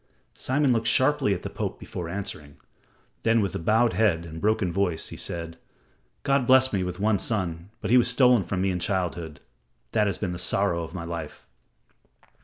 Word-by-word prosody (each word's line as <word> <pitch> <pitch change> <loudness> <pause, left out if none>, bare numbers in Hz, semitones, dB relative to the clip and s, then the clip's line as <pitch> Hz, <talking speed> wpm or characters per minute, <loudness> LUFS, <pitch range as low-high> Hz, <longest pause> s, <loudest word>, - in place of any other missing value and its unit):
Simon 135 0 +1
looked 115 -1 0
sharply 130 -1 +3
at 95 - -2
the - - -4
Pope - - -4
before 85 -2 -6
answering. 75 -6 -5 0.6
Then, 115 0 +3
with 100 -5 -2
bowed 115 +4 +3
head 95 -7 +2
and 80 0 -8
broken 105 -4 +1
voice, 90 -4 -1
he - - -8
said: 85 -1 -5 0.6
"God 135 -3 +1
blessed 130 -1 +5
me 95 -2 +1
with 90 0 -5
one 105 -1 +2
son, 90 -4 -2
but 110 - -2
he 125 - +7
was 120 - +2
stolen 125 -2 +5
from 95 0 -2
me 95 - +1
in 90 - -2
childhood. 85 -4 -3 0.5
That 105 -2 +2
has 100 - -1
been 90 -4 -3
the 85 - -6
sorrow 95 -2 +1
of 85 +2 -7
my 85 - -4
life." 85 -2 -7
95 Hz, 190 wpm, -26 LUFS, 85-115 Hz, 0.6 s, he